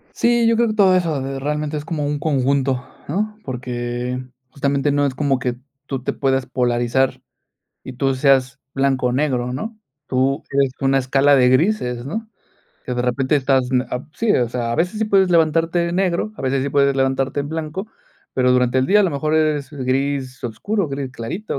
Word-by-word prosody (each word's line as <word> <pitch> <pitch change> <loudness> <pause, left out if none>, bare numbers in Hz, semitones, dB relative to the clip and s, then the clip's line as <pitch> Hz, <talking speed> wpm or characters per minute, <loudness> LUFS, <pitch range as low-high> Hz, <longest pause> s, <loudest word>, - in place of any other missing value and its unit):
Sí, 235 0 +3
yo 230 - +4
creo 235 +1 +3
que 215 - -2
todo 195 -3 +5
eso, 170 -5 +1
eh, 135 0 -4
realmente 150 +2 -2
es 150 0 -4
como 155 -2 -2
un 145 0 -2
conjunto, 135 -2 0 0.2
¿no?, 210 +7 -2
porque 125 0 -4 0.3
justamente, 140 +1 0
no 145 0 +2
es 130 - -4
como 140 -2 +1
que 125 -1 -2 0.3
tú 135 -3 -4
te - - -1
puedas 135 -1 0
polarizar, 125 +1 0 0.6
y - - -7
tú 135 +2 0
seas 135 0 +2
blanco 135 -2 +1
o - - -1
negro, 125 -3 0
¿no?, 220 - -5 0.3
tú 135 +1 0
eres 135 -1 +2
una 135 0 +2
escala 135 +2 +3
de 125 -1 +5
grises, 130 - +1
¿no?, 220 +9 -5 0.6
que 125 - -2
de 120 - -1
repente, 130 +3 +1
estás 130 -2 +1
n 130 -1 +2
ab 125 +3 -4
sí, 225 -2 +1
o 120 -2 +2
sea, 115 -1 -2
a - - 0
veces 180 - 0
sí 220 - +1
puedes 195 -3 +3
levantarte 165 0 +2
de 170 0 -1
negro, 185 +3 0
a - - -7
veces 135 0 0
sí 140 - -2
puedes 140 0 +3
levantarte 135 +1 0
en 145 +1 -5
blanco, 160 +5 -4 0.5
pero, 125 -1 +2
durante 125 0 +3
el 130 - +2
día 210 +6 +5
a - - +4
lo 190 - +1
mejor, 155 +2 -1
eres 155 -3 +1
gris 135 -1 -2
oscuro, 175 - -2
gris 135 -1 -4
clarito, 140 - -5
140 Hz, 200 wpm, -20 LUFS, 130-155 Hz, 0.6 s, todo